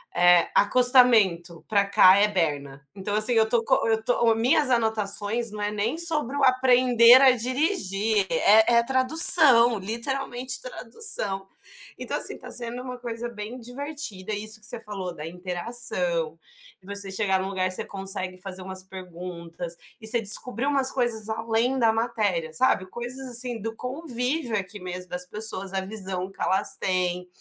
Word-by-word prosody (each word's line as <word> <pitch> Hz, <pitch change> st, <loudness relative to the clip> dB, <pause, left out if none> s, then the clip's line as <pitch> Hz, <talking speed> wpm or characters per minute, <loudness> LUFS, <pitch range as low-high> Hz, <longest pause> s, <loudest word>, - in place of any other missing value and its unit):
é 175 Hz, -1 st, +4 dB
acostamento 210 Hz, -8 st, +3 dB
pra 200 Hz, -2 st, +1 dB
cá 195 Hz, -1 st, +5 dB
é 210 Hz, -, +3 dB
berna, 145 Hz, -7 st, -4 dB
então 205 Hz, +2 st, -5 dB
assim 215 Hz, +3 st, +5 dB
eu 220 Hz, -1 st, +2 dB
tô 230 Hz, -1 st, 0 dB
co -, -, 0 dB
eu 220 Hz, 0 st, -1 dB
tô 235 Hz, -2 st, +1 dB
minhas 260 Hz, +5 st, +1 dB
anotações 220 Hz, -1 st, 0 dB
não 210 Hz, -, -9 dB
é 205 Hz, 0 st, -2 dB
nem 220 Hz, +9 st, -3 dB
sobre 305 Hz, -6 st, -1 dB
o 280 Hz, -, -2 dB
aprender 255 Hz, -1 st, +5 dB
a 265 Hz, -1 st, +6 dB
dirigir, 225 Hz, -, -2 dB
é 220 Hz, -1 st, +3 dB
é -, -, +5 dB
a 235 Hz, -, -1 dB
tradução, 260 Hz, -, +7 dB
literalmente 245 Hz, +4 st, -5 dB
tradução. 385 Hz, -, -3 dB, 0.5 s
Então, -, -, -4 dB
assim, -, -, +2 dB
tá -, -, -12 dB
sendo 240 Hz, +1 st, -3 dB
uma 250 Hz, -1 st, -8 dB
coisa 240 Hz, -1 st, -6 dB
bem 225 Hz, +3 st, -9 dB
divertida 245 Hz, -5 st, -7 dB
isso 215 Hz, +1 st, -2 dB
que 215 Hz, -, 0 dB
você 240 Hz, -2 st, -2 dB
falou 195 Hz, -5 st, -8 dB
da 150 Hz, -, -9 dB
interação, 180 Hz, -2 st, 0 dB, 0.4 s
de 185 Hz, -, -26 dB
você 200 Hz, -1 st, -9 dB
chegar 190 Hz, -1 st, -1 dB
num 190 Hz, -, -5 dB
lugar 185 Hz, -1 st, -3 dB
você -, -, -3 dB
consegue 190 Hz, -1 st, -6 dB
fazer 190 Hz, -1 st, -8 dB
umas 185 Hz, 0 st, -7 dB
perguntas, 175 Hz, -2 st, -9 dB, 0.3 s
e -, -, -11 dB
você 235 Hz, 0 st, +2 dB
descobrir 240 Hz, +5 st, +3 dB
umas 275 Hz, -2 st, +2 dB
coisas 235 Hz, -4 st, -3 dB
além 225 Hz, +4 st, -2 dB
da 225 Hz, -2 st, +3 dB
matéria, 210 Hz, -9 st, -3 dB
sabe, 185 Hz, 0 st, 0 dB
coisas 250 Hz, +4 st, -8 dB
assim 240 Hz, -1 st, +2 dB
do 225 Hz, +1 st, -6 dB
convívio 255 Hz, -1 st, -4 dB
aqui 195 Hz, +2 st, -7 dB
mesmo 180 Hz, 0 st, -9 dB
das 180 Hz, 0 st, -6 dB
pessoas, 195 Hz, -1 st, -6 dB
a 190 Hz, -, -2 dB
visão 190 Hz, -2 st, -7 dB
que 195 Hz, -, -24 dB
elas 190 Hz, -, -2 dB
tem, 180 Hz, -1 st, -3 dB
220 Hz, 165 wpm, -24 LUFS, 190-245 Hz, 0.5 s, tradução